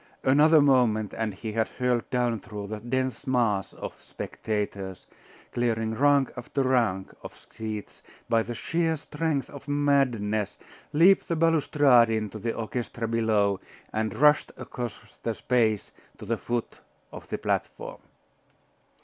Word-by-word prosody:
Another 150 +4 +6
moment 120 -7 +3
and 110 -1 -1
he 110 +3 -6
had 110 +1 0
hurled 125 -2 -1
down 120 -3 0
through 105 +1 -7
the 105 +1 -5
dense 130 +4 -2
mass 115 -7 +1
of - - -7
spectators, 100 -3 -5 0.5
clearing 115 -2 0
rank 140 +2 +3
after 130 +2 -2
rank 115 -8 +1
of - - -10
seats 110 -2 -6 0.3
by 115 -1 +3
the 120 +1 -5
sheer 165 +7 0
strength 150 -1 -2
of 140 - -11
madness, 130 -8 +1 0.3
leaped 175 +6 +5
the 170 - 0
balustrade 145 -7 +4
into 110 -1 -2
the 115 +2 -2
orchestra 115 0 -3
below, 110 -4 +2 0.3
and 110 0 -1
rushed 150 +1 +4
across 120 -4 -5 0.3
the 115 -1 -2
space 110 -4 +1 0.3
to - - -9
the 115 +2 -1
foot 120 +2 -3 0.3
of - - -10
the - - -3
platform. - - -3
120 Hz, 135 wpm, -27 LUFS, 110-135 Hz, 0.5 s, Another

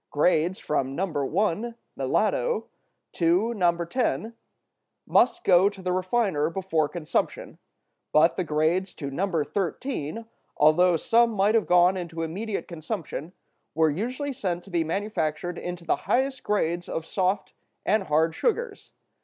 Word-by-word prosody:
Grades 170 +4 +2
from 135 -3 -2
No. 190 - 0
1 185 - -1 0.2
(melado) - - 0 0.5
to 180 +7 +2
No. 175 -4 +1
10 235 +1 -1 0.7
must 355 - +3
go 185 +1 +5
to 200 -1 -13
the 185 -1 -2
refiner 185 -5 +1
before 165 -4 0
consumption; 170 -4 -3 0.5
but 160 +3 +5
the 185 - -1
grades 165 +4 0
to 140 -2 -5
No. 170 +1 0
13, 200 - -3 0.3
although 165 +4 +5
some 235 +7 +3
might 210 -1 +2
have 225 -2 +2
gone 180 +1 +5
into 165 -2 -4
immediate 200 +6 -4
consumption, 165 -1 -5 0.4
were 160 -1 +3
usually 255 - -3
sent 180 -7 -3
to 195 - -14
be 170 -2 +1
manufactured 175 -2 -2
into 175 -1 -6
the - - +1
highest 265 +1 +1
grades 175 -4 -1
of 160 - -3
soft 190 +2 -1 0.3
and 210 -1 +2
hard 160 +1 +2
sugars. 470 - -2
180 Hz, 135 wpm, -26 LUFS, 160-210 Hz, 0.7 s, go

